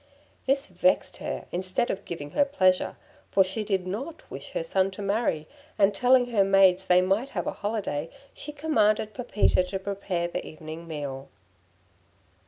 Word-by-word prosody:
This 275 +1 +3
vexed 275 -1 +1
her - - -5
instead 185 +6 0
of 200 - -6
giving 145 -4 -6
her 285 - +4
pleasure, 185 -10 +2 0.3
for 195 - +5
she 190 +4 -3
did 195 -3 -1
not 265 - -5
wish - - -8
her - - -1
son 190 - +1
to - - -5
marry, 200 -6 0 0.3
and 200 0 +4
telling 245 +3 +4
her 205 -4 +4
maids 190 -1 +4
they 180 0 +6
might 200 +8 +1
have - - -1
a - - -1
holiday, 200 -8 -3 0.2
she 295 - -7
commanded 215 -8 +1
Pepita 235 -6 +2
to 190 +2 -3
prepare 190 -3 -2
the 175 - -4
evening 160 +1 -9
meal. 140 -3 -5
195 Hz, 165 wpm, -27 LUFS, 180-235 Hz, 0.3 s, they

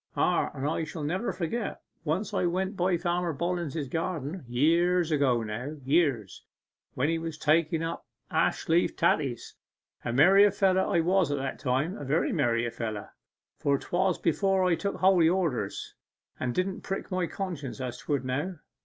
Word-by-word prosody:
Ah, - - +2
I 150 +4 -1
shall 155 0 -6
never 185 +10 -1
forget 200 +5 -3 0.2
once 165 +6 -1
when - - +1
I - - +3
went 190 +3 -1
by 180 -1 +1
Farmer 175 -1 -1
Bollens's 170 -3 -2
garden 165 +2 -3
years 165 +7 +2
ago 135 -6 +2
now 120 +8 -5
years, 135 - +1 0.5
when 130 - +1
he 165 +1 0
was 165 -1 -5
taking 160 +1 +2
up 165 - -5 0.2
ashleaf 170 +2 +1
taties. 140 -7 0 0.5
A 120 - -2
merry 190 +11 +6
feller 190 -1 +2
I 170 - +2
was 180 -2 +2
at 145 - 0
that 135 0 -4
time, 135 +7 -1
a - - -6
very 145 +4 +1
merry 115 0 +1
feller 110 -3 -5 0.5
for 140 -1 +2
'twas 185 +4 0
before 190 +3 +1
I 180 - +3
took 200 +4 -2
holy 185 -3 +4
orders, 160 - -1 0.5
and 125 - -1
it 120 - -3
didn't 190 0 -5
prick 195 - -5
my 185 -2 0
conscience 165 -10 -5
as 125 -1 -4
'twould 135 0 -2
now. 145 +9 -2
165 Hz, 165 wpm, -28 LUFS, 135-180 Hz, 0.5 s, merry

